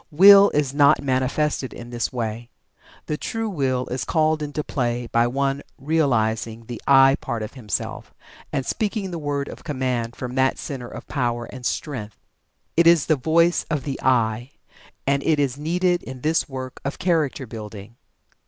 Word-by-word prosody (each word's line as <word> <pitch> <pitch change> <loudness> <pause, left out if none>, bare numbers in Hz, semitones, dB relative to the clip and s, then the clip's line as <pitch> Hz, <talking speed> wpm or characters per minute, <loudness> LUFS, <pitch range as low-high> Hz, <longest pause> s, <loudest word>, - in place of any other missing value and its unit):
Will 200 +5 +8
is 145 -2 0
not 145 0 +4
manifested 130 +1 0
in 120 0 -9
this 120 -1 -2
way. 115 -1 -4 0.6
The 150 - -2
true 225 +6 -3
Will 135 -9 -1
is 125 -1 -2
called 155 -1 +1
into 150 0 -3
play 120 -4 -2
by 115 0 +2
one 135 +2 -1 0.2
realizing 115 -7 0
the 120 -1 -7
"I" 135 0 +6
part 115 -2 -3
of 105 - -7
himself 115 -6 -4 0.4
and 135 - -2
speaking 205 -3 -2
the 170 - -4
word 145 -1 -2
of - - -10
command 130 -5 -2
from 125 -1 -6
that 130 0 +2
center 130 -5 -6
of - - -9
power 120 -4 -1
and 130 -1 -9
strength. 110 -9 -4 0.6
It 170 0 +5
is 170 -4 +6
the 155 - +3
voice 165 +5 +2
of 150 -4 -1
the 140 -2 -4
"I." 120 0 +1 0.5
And 140 0 +2
it 155 0 +2
is 140 -4 +1
needed 175 +3 +1
in 130 -1 -9
this 155 +1 +1
work 130 -1 -7
of 140 - -3
character 160 -7 0
building. 110 -1 -9
135 Hz, 170 wpm, -23 LUFS, 120-155 Hz, 0.6 s, Will